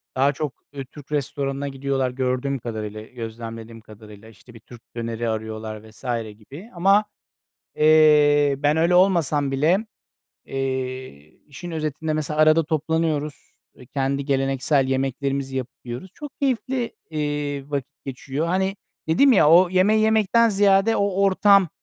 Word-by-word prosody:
Daha 140 +2 +2
çok, 150 -2 -4 0.2
ııı, 135 -1 -5
Türk 145 +2 -15
restoranına 140 -1 -2
gidiyorlar 135 -1 -2
gördüğüm 130 +2 -2
kadarıyla, 110 -2 -6
gözlemlediğim 115 -1 -8
kadarıyla. 105 0 -14
İşte, 115 +3 -18
bir 115 - -13
Türk 115 +1 -15
döneri 115 0 -3
arıyorlar 110 0 -5
vs. 110 - -19 0.4
gibi 145 - -12
ama, 195 +4 +3 0.7
eee, 150 -2 +5
ben 145 +1 +1
öyle 170 +2 +2
olmasam 165 -6 +3
bile, 150 +7 +2 0.7
eee, 130 - -4 0.3
işin 175 +4 -9
özetinde 155 -1 -3
mesela 155 0 -2
arada 155 +1 +5
toplanıyoruz, 155 -2 -2 0.2
eee, 125 - -16
kendi 135 +1 -2
geleneksel 135 0 +1
yemeklerimizi 135 0 -2
yapıp 130 +1 -4
yiyoruz. 125 +10 -7
Çok 295 -2 -10
keyifli, 255 -2 -1
eee, 145 -2 -3
vakit 140 -3 -5
geçiyor. 135 +3 -4
Hani, 190 +3 0 0.3
dedim 265 +13 +5
ya, 155 -9 +5
o 175 +2 +7
yemeği 195 +4 +3
yemekten 220 +1 +3
ziyade 200 +1 +3
o 200 - +1
ortam, 195 -1 +4
145 Hz, 135 wpm, -23 LUFS, 130-165 Hz, 0.7 s, o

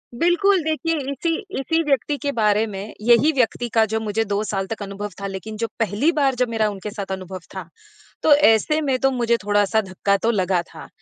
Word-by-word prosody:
बिल्कुल। 350 +7 +3
देखिए, 315 +1 -1 0.2
इसी 330 +4 -1 0.2
इसी 325 +4 +1
व्यक्ति 290 0 0
के 285 0 -2
बारे 215 -2 +2
में 200 +1 -7
यही 240 +7 +5
व्यक्ति 245 -3 0
का 225 - +5
जो 220 +1 -2
मुझे 220 +1 -1
2 205 +1 -1
साल 195 -2 -3
तक 220 0 -6
अनुभव 200 +1 -6
था, 200 - -3
लेकिन 195 +3 -7
जो 230 +1 -1
पहली 225 - +1
बार 275 -5 +1
जब 250 -1 0
मेरा 220 -2 +1
उनके 205 +1 -6
साथ 200 -2 -6
अनुभव 185 0 -5 0.2
था, 185 -3 -6 0.6
तो 310 - +6
ऐसे 295 +2 +3
में 270 -3 0
तो 270 0 +2
मुझे 235 -2 +1
थोड़ा-सा 205 +1 +2
धक्का 200 +1 0
तो 230 - +3
लगा 185 -4 +1
था। - - -10
220 Hz, 205 wpm, -22 LUFS, 205-275 Hz, 0.6 s, तो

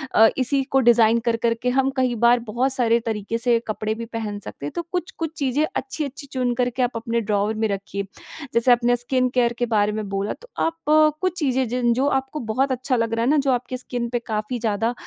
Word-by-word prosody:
अ, 225 - +8
इसी 270 +2 +2
को 270 0 +1
डिज़ाइन 235 -2 +5
कर 235 -1 +2
करके 230 +1 +1
हम 265 +1 +2
कई 255 -1 +2
बार 235 +2 +4
बहुत 255 +4 +1
सारे 235 -2 +2
तरीके 220 0 -2
से 235 0 +2
कपड़े 215 0 -2
भी 230 +1 -6
पहन 220 -3 -5
सकते 145 - -9
हैं। 145 - -4
तो - - -1
कुछ-कुछ 340 -3 -3
चीज़ें, 280 +2 +1
अच्छी-अच्छी 280 +1 -4
चुन 250 -2 0
करके 250 +1 0
आप 245 - +1
अपने 230 +1 -1
ड्रॉवर 210 0 0
में - - +3
रखिए, 200 0 -4 0.5
जैसे 235 +2 +4
अपने 240 0 +4
स्किन 255 +1 +1
केयर 240 -1 +3
के 245 - +2
बारे 210 0 +3
में 215 -1 -4
बोला, 195 +1 -2
तो - - -16 0.2
आप 330 -1 -3
अ, 310 0 +6
कुछ 370 -1 -1
चीज़ें 260 -4 +1
जिन 240 0 +1
जो 260 +4 +1
आपको 265 +3 -7
बहुत 270 +3 +1
अच्छा 255 +1 0
लग 230 -1 0
रहा 230 0 0
है - - +2
ना, 305 - +4
जो 275 -1 +2
आपके 250 0 -2
स्किन 245 -2 -4
पे 240 - -1
काफ़ी 215 +3 -2
ज़्यादा 225 +1 0
240 Hz, 225 wpm, -22 LUFS, 225-265 Hz, 0.5 s, अ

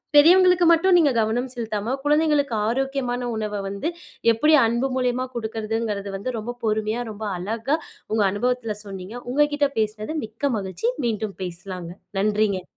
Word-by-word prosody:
பெரியவங்களுக்கு 360 +3 +7
மட்டும், 355 +2 +5
நீங்க 300 -5 +4
கவனம் 230 +4 0
செலுத்தாம, 225 -1 -3
குழந்தைகளுக்கு 295 -3 +2
ஆரோக்கியமான 250 0 -1
உணவ 210 -1 -3
வந்து, 200 +10 -3 0.4
எப்படி 300 +8 +3
அன்பு 235 +4 +1
மூலியமா 255 0 0
கொடுக்கறதுங்கிறது 220 -2 -3
வந்து 240 +5 -4
ரொம்ப 240 +3 -5
பொறுமையா, 215 +1 0
ரொம்ப 215 +1 -6
அழகா 225 - -1 0.3
உங்க 215 -1 +3
அனுபவத்தில 230 +1 -1
சொன்னீங்க. 195 +2 -8 0.2
உங்க 295 +2 +4
கிட்ட 290 -1 +2
பேசினது 215 +5 -2
மிக்க 270 +6 -2
மகிழ்ச்சி. 190 +3 -2 0.2
மீண்டும் 215 -3 -2
பேசலாங்க. 180 -1 -6 0.3
நன்றிங்க. 205 -2 +1
225 Hz, 135 wpm, -23 LUFS, 210-270 Hz, 0.4 s, பெரியவங்களுக்கு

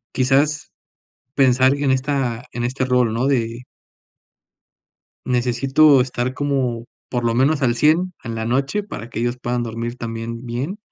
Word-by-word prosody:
Quizás, 140 +3 +1 0.6
pensar 130 -1 +4
en 140 -2 0
esta 130 -3 -1
en 120 0 -3
este 130 +2 -2
rol, 125 -3 +2
¿no? 120 +3 0
de 120 -3 -1 1.6
Necesito 130 +4 +4
estar 125 0 -2
como 130 -4 -1 0.3
por 120 -1 -2
lo 115 - +1
menos 140 +5 +2
al 120 -2 +2
100 160 +7 +3
en 115 -1 -4
la 110 - -3
noche, 135 - 0
para 120 - -8
que - - -5
ellos 120 +1 -1
puedan 120 0 -1
dormir 115 +1 -4
también 115 0 -6
bien. 130 - -4
125 Hz, 150 wpm, -20 LUFS, 120-135 Hz, 1.6 s, pensar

